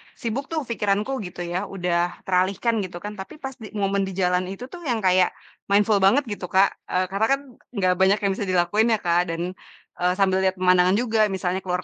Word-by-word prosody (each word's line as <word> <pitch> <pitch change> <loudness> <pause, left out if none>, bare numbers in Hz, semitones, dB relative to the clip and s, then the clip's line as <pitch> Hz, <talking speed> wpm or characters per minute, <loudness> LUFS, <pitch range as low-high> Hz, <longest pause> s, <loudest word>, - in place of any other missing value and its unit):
sibuk 260 +2 -4
tuh 315 -2 -1
pikiranku 210 -1 -1 0.2
gitu 175 0 -7
ya, 175 +3 -3
udah 175 -2 -2
teralihkan 195 +5 +1
gitu 185 -3 -5
kan, 210 -1 -7
tapi 190 - -8
pas 270 - -3
di 220 - -8
momen 195 -1 0
di 190 - -6
jalan 180 -1 +1
itu 195 +5 -7
tuh 360 - -8
yang 230 -4 -1
kayak 185 -1 +3 0.3
mindful 205 +1 +3
banget 220 +10 +4
gitu 195 -3 -5
Kak, 190 +2 +4 0.2
eee, 185 - +1
karena 200 +3 +1
kan 275 - -11 0.3
enggak 185 -3 +2
banyak 190 +2 +4
yang 200 - +2
bisa 205 - -3
dilakuin 185 +5 +2
ya - - -2
Kak, 175 +1 +2
dan, 165 0 -3 0.6
eee, 180 0 +2
sambil 190 -1 +2
lihat 190 0 +1
pemandangan 180 0 +4
juga 225 0 0 0.2
misalnya 185 0 -1
ke 190 - -16
luar 180 0 -1
190 Hz, 215 wpm, -23 LUFS, 180-210 Hz, 0.6 s, banget